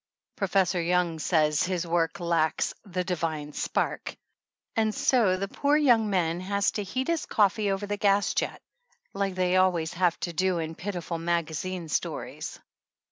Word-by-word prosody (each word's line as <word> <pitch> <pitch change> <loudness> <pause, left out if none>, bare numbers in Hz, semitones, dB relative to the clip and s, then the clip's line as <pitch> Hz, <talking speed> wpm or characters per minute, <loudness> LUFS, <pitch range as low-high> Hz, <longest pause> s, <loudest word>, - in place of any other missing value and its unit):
Professor 190 -2 +1
Young 170 -1 +1
says 150 -1 +2
his 180 -1 0
work 165 -1 0
lacks 170 -2 +1
"the 185 -3 -3
divine 160 -4 -3
spark," - - -2 0.6
and 220 -1 +1
so 215 -8 +3
the 195 +1 -2
poor 285 +8 +2
young 240 -8 +4
man 175 -3 +1
has 200 +2 0
to 210 - -3
heat 255 +7 -3
his 335 -2 -1
coffee 210 -1 +2
over 195 +1 -1
the 205 0 -3
gas 200 0 +2
jet, - - -2 0.5
like 195 -1 -1
they 185 0 +2
always 175 -3 +2
have 175 -1 +1
to 175 - -3
do 185 +2 +1
in 160 -1 -3
piti 180 +1 -4
ful 165 0 -4
magazine 170 +1 -2
stories. 150 - -3
185 Hz, 160 wpm, -27 LUFS, 170-200 Hz, 0.6 s, young